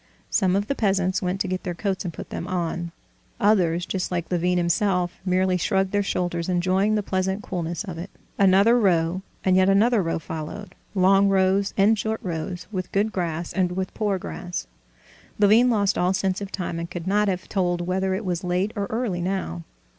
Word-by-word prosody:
Some 185 -3 +2
of 200 +1 +1
the 280 - -1
peasants 190 -6 +1
went 180 +1 -1
to 185 -2 0
their 180 -2 -5
coats 195 +1 -2
and 175 - -3
put - - -9
them - - -4
on; 170 -1 -2 0.5
others—just 185 -2 +1
like 175 -2 -3
Levin 180 +1 +1
himself—merely 180 +1 +1
shrugged 190 +2 +1
their 205 - +2
shoulders, 175 -3 -2
enjoying 185 +4 +2
the 210 - 0
pleasant 190 +2 -1
coolness 170 +1 -3
of 180 -6 -7
it. 180 +3 -6 0.3
Another 200 +5 +5
row, 175 -3 +2 0.2
and 185 -1 +4
yet 190 +1 +4
another 215 +3 +4
row, 165 -2 -1
followed—long 195 +4 0
rows 195 +1 +2
and 210 +2 +4
short 220 +1 -2
rows, 175 0 -4
with 185 -3 -4
good 205 +2 +1
grass 170 -3 -3
and 180 -2 +1
with 185 0 -3
poor 205 -3 0
grass. 180 - -5 0.7
Levin 215 +4 +5
lost 205 -4 +2
all 180 +1 +2
sense 190 +1 -1
of 200 -1 -6
time, 175 -3 -3
and 170 0 -5
could 175 -1 -6
not 205 +2 +2
have 185 -2 -2
told 175 -3 0
whether 190 +2 0
it 205 +2 -4
was 180 0 -2
late 180 +3 0
or 200 -1 -2
early 220 -6 -2
now. 175 - -2
185 Hz, 185 wpm, -24 LUFS, 175-200 Hz, 0.7 s, Another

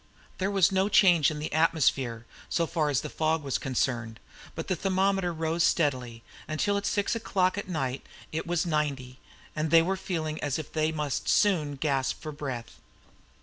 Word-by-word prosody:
There 190 +1 0
was 195 -2 +3
no 190 +1 +2
change 175 -7 +5
in 155 - -5
the 150 0 -4
atmosphere, 135 -7 +1 0.2
so 170 - +1
far 155 -2 0
as 140 -1 +1
the - - -5
fog 160 0 0
was 135 -2 -1
concerned, 120 -3 -2 0.4
but 165 - -5
the 185 - 0
thermometer 190 0 +1
rose 165 +1 -1
steadily, 125 -8 0 0.2
until 200 +7 0
at 200 0 -1
six 205 +2 0
o'clock 185 -5 +1
at 200 - -5
night 135 -6 -2 0.3
it 160 +2 -3
was 175 0 0
at 170 - -3
ninety, 135 -4 -2 0.4
and 155 +1 -1
they 165 +1 +6
were 190 +3 0
feeling 160 -5 -3
as 145 -2 -1
if 155 - -7
they 155 0 +1
must 150 -3 -2
soon 160 -9 +2
gasp 135 -2 -1
for 155 - -6
breath. 135 -6 -6
155 Hz, 185 wpm, -28 LUFS, 140-180 Hz, 0.4 s, they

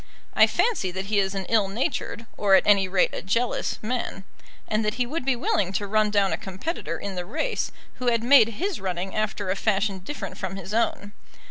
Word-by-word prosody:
I - - +6
fancy 445 - +1
that 190 +2 -4
he 205 - +5
is 190 0 0
an 190 -1 -3
ill 215 -2 +2
natured 230 - -3
or 200 -2 +4
at - - +4
any 200 -2 +5
rate 185 0 +2
a - - -4
jealous 230 +6 -1
man; 230 -4 -3 0.4
and 215 +1 0
that 210 +1 -1
he 250 0 0
would 305 +5 -3
be 265 0 +2
willing 195 -5 0
to 205 - -1
run 215 +1 +2
down 200 -2 +2
a - - -1
competitor 195 - -4
in 200 -1 -5
the 180 -1 -3
race 235 - -2 0.3
who 250 - -3
had 230 -1 +2
made 255 -2 +7
his 380 - -2
running 185 0 -3
after 215 -3 -1
a - - 0
fashion 200 -1 0
different 265 +11 -7
from 190 -1 -4
his 195 +1 -7
own. 210 -2 0
205 Hz, 215 wpm, -25 LUFS, 190-235 Hz, 0.4 s, made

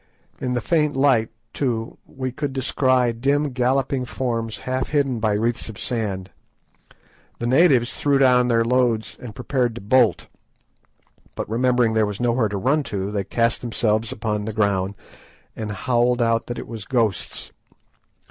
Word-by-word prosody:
In 125 -1 -2
the 120 - -1
faint 150 +1 +1
light, 135 -5 +3 0.2
too, 115 -4 -2
we 130 -1 -4
could 135 +2 -4
descry 130 -2 +2
dim 140 +5 0
galloping 130 +1 0
forms 115 -3 -3
half 130 0 -1
hidden 140 -5 +1
by 110 -1 +1
wreaths 115 +2 0
of 110 - -9
sand. 100 -6 -3 1.1
The 120 - -4
natives 130 -2 +4
threw 145 -1 +2
down 125 -2 +4
their 115 -1 +2
loads 120 -2 +1
and 115 -4 -8
prepared 125 -2 -1
to 120 - -7
bolt, 120 +3 +3 1.1
but - - -4
remembering 120 0 +2
that 110 - +2
there 110 - +4
was 105 -1 -5
nowhere 120 -2 +1
to 100 - -3
run 135 +10 +2
to, 100 0 -3
they 100 -2 -1
cast 115 +4 0
themselves 110 -2 0
upon 105 -1 -2
the 110 - -4
ground 100 -2 0 0.6
and 110 -2 -4
howled 120 +4 +1
out 115 -1 +1
that 120 - -4
it - - -6
was 110 -4 -7
ghosts. 115 -5 -1
120 Hz, 160 wpm, -22 LUFS, 110-130 Hz, 1.1 s, natives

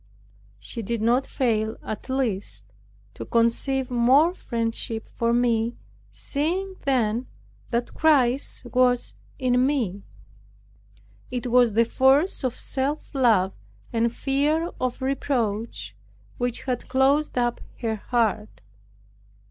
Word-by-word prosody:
She 105 - -7
did 230 +2 -2
not 240 +5 +2
fail, 220 -3 0
at 215 +4 -6
last, 205 - -2 0.5
to - - -7
conceive 245 - +1
more 260 +8 +4
friendship 230 -5 -2
for 235 0 -1
me, 235 -1 +1 0.4
seeing 360 +7 -2
then 245 -3 +1 0.4
that 240 0 -2
Christ 270 -5 +2
was 245 0 +2 0.2
in 250 -2 +2
me. 240 -9 0 1.3
It 250 0 -4
was 245 -3 +5
the 230 +2 +4
force 270 +9 +3
of 255 -1 -2
self 280 +4 -2
love, 220 -8 +3 0.4
and 230 0 +2
fear 295 +7 0
of 255 0 -2
reproach, 225 - -2 0.4
which 245 -1 -2
had 250 -2 -3
closed 275 +2 +2
up 240 -1 0 0.2
her 225 -2 -1
heart. 215 -1 -1
245 Hz, 110 wpm, -25 LUFS, 225-270 Hz, 1.3 s, was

